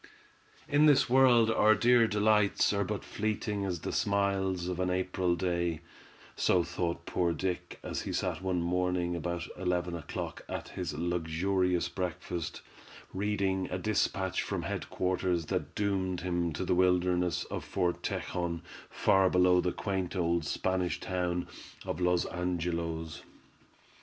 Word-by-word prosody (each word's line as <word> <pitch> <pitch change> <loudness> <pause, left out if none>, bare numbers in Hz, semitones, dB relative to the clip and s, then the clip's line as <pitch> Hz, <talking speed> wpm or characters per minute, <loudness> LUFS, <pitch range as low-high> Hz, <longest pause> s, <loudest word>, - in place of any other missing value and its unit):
In 150 0 +5
this 135 -4 +4
world 125 -4 +6
our 110 0 +5
dear 120 +2 +5
delights 105 -1 +3
are 100 0 +1
but 105 +1 -3
fleeting 105 -1 -2
as 90 -4 -3
the - - -3
smiles 95 -3 0
of 90 -1 -3
an 90 0 +1
April 90 -1 0
day—so 85 0 -2
thought 85 0 -3
poor 85 -2 0
Dick 90 0 -3
as - - -3
he - - -4
sat - - -2
one 90 -2 0
morning 90 0 0
about 85 0 -3
eleven 90 -1 -1
o'clock 80 -3 -5
at - - -5
his - - -4
luxurious 85 +2 0
breakfast, 90 -2 -4 0.5
reading 95 -1 0
a - - -2
dispatch 95 -2 0
from - - -3
head - - -4
quarters 90 -2 0
that - - -3
doomed 95 -3 -1
him 85 -2 -1
to 95 - -3
the - - +2
wilderness 90 -1 +2
of - - -3
Fort 90 -2 -1
Tejon, 85 -2 -3 0.3
far 95 -1 +3
below 90 0 +4
the 90 - 0
quaint 95 -1 -3
old 85 -2 +1
Spanish 95 +2 -1
town 90 -1 -2 0.4
of - - -3
Los 90 -1 +2
Angelos. 85 -2 -3
90 Hz, 140 wpm, -31 LUFS, 85-95 Hz, 0.5 s, world